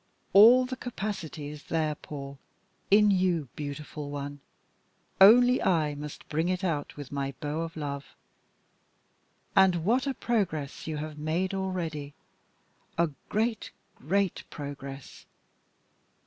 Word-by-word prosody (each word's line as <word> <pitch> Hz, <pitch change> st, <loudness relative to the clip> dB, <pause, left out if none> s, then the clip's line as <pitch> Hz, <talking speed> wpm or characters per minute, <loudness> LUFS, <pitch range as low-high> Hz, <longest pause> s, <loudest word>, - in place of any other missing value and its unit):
All 235 Hz, +6 st, +8 dB
the 255 Hz, +1 st, -4 dB
capacity 195 Hz, -, -5 dB
is 150 Hz, -1 st, -10 dB
there, 155 Hz, -1 st, 0 dB
Paul, 140 Hz, -2 st, -8 dB, 0.5 s
in 210 Hz, +1 st, +6 dB
you, 180 Hz, -7 st, +1 dB
beautiful 150 Hz, 0 st, -6 dB
one 145 Hz, 0 st, -5 dB, 0.8 s
only 245 Hz, +5 st, +8 dB
I 160 Hz, -5 st, +2 dB
must 145 Hz, 0 st, -8 dB
bring 160 Hz, +3 st, 0 dB
it 185 Hz, +1 st, -1 dB
out 155 Hz, -6 st, -2 dB
with 145 Hz, -2 st, -8 dB
my 140 Hz, -1 st, -3 dB
bow 150 Hz, +2 st, -2 dB
of 165 Hz, 0 st, -5 dB
love! 140 Hz, -2 st, -5 dB, 1.4 s
And 185 Hz, -4 st, +4 dB
what 250 Hz, +6 st, +2 dB
a 270 Hz, -, -1 dB
progress 160 Hz, -, -2 dB
you 155 Hz, -1 st, -3 dB
have 150 Hz, 0 st, -6 dB
made 170 Hz, +6 st, -1 dB
already 170 Hz, -7 st, -3 dB, 0.8 s
a 170 Hz, -2 st, +2 dB, 0.2 s
great, 220 Hz, +1 st, 0 dB, 0.3 s
great 190 Hz, +5 st, 0 dB
progress. 140 Hz, -2 st, -8 dB
160 Hz, 120 wpm, -28 LUFS, 145-195 Hz, 1.4 s, All